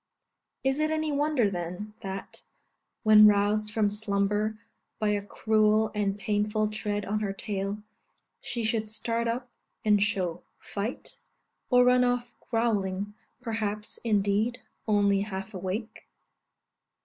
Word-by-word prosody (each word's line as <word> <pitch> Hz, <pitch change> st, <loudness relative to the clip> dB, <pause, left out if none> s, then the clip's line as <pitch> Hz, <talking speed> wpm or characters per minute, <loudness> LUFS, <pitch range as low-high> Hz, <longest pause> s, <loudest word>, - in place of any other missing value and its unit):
Is 270 Hz, +2 st, +1 dB
it 310 Hz, 0 st, +2 dB
any 315 Hz, -1 st, 0 dB
wonder, 290 Hz, -5 st, +2 dB
then, 180 Hz, +3 st, -4 dB
that, 195 Hz, 0 st, -6 dB, 0.6 s
when 215 Hz, -1 st, +9 dB
roused 210 Hz, +1 st, +2 dB
from 210 Hz, -2 st, +2 dB
slumber 210 Hz, 0 st, 0 dB, 0.4 s
by 215 Hz, -, 0 dB
a 205 Hz, -1 st, +1 dB
cruel 215 Hz, +1 st, +2 dB
and 205 Hz, -1 st, 0 dB
painful 210 Hz, +1 st, 0 dB
tread 210 Hz, -1 st, -3 dB
on 210 Hz, +2 st, -1 dB
her 200 Hz, -2 st, -2 dB
tail, 200 Hz, 0 st, -3 dB, 0.6 s
she 240 Hz, -, -3 dB
should 220 Hz, -1 st, 0 dB
start 230 Hz, +2 st, -1 dB
up 245 Hz, +2 st, -2 dB, 0.4 s
and 210 Hz, -1 st, +4 dB
show 190 Hz, -5 st, 0 dB, 0.2 s
fight, 210 Hz, +5 st, -5 dB, 0.5 s
or 250 Hz, -1 st, +6 dB
run 250 Hz, 0 st, +5 dB
off 245 Hz, -1 st, 0 dB, 0.2 s
growling 205 Hz, -4 st, 0 dB, 0.3 s
perhaps, 215 Hz, -2 st, -3 dB
indeed, 215 Hz, +2 st, +1 dB, 0.3 s
only 200 Hz, -2 st, +3 dB
half 195 Hz, 0 st, -5 dB
awake? 200 Hz, +4 st, -5 dB
210 Hz, 125 wpm, -28 LUFS, 200-230 Hz, 0.6 s, when